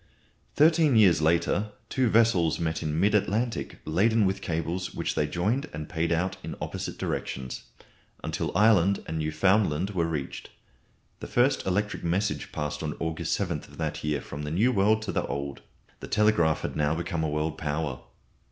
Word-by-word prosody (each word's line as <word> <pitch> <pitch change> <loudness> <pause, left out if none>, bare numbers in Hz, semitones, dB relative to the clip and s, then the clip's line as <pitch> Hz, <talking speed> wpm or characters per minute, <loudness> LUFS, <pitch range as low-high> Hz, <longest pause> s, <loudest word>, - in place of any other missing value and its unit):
Thirteen 155 -2 +5
years 95 -8 +5
later 85 +6 +1
two 130 0 +1
vessels 110 -8 +3
met 80 -1 -1
in 75 +1 -1
mid 100 +3 +3
Atlantic 110 +3 0
laden 105 +7 +3
with 95 +1 -1
cables 85 +1 -3
which - - -1
they 75 - 0
joined 105 - -1
and 75 0 -5
paid 80 +1 -1
out 85 +3 0
in - - -5
opposite - - -5
directions, 65 -1 -4 0.7
till - - -2
Ireland 100 -3 +4
and 80 0 -3
Newfoundland 90 +3 +2
were 85 -4 0
reached. 75 -5 -5 0.7
The - - -7
first 130 0 +2
electric 105 +3 -1
message 85 -3 -1
passed 75 -1 -3
on 75 -1 -4
August 80 0 -1
7th 85 -7 -3
of - - -16
that - - -3
year 75 -1 -1
from 75 - -7
the 75 - -4
New 105 +11 +2
World 110 0 +3
to 110 - -3
the - - -1
Old. 70 0 -4 0.4
The - - -8
telegraph 95 -8 +3
had - - -4
now 75 +1 +1
become 85 0 -2
a 80 - 0
world 75 +1 -2
power. 75 -3 -2
85 Hz, 170 wpm, -27 LUFS, 75-105 Hz, 0.7 s, Thirteen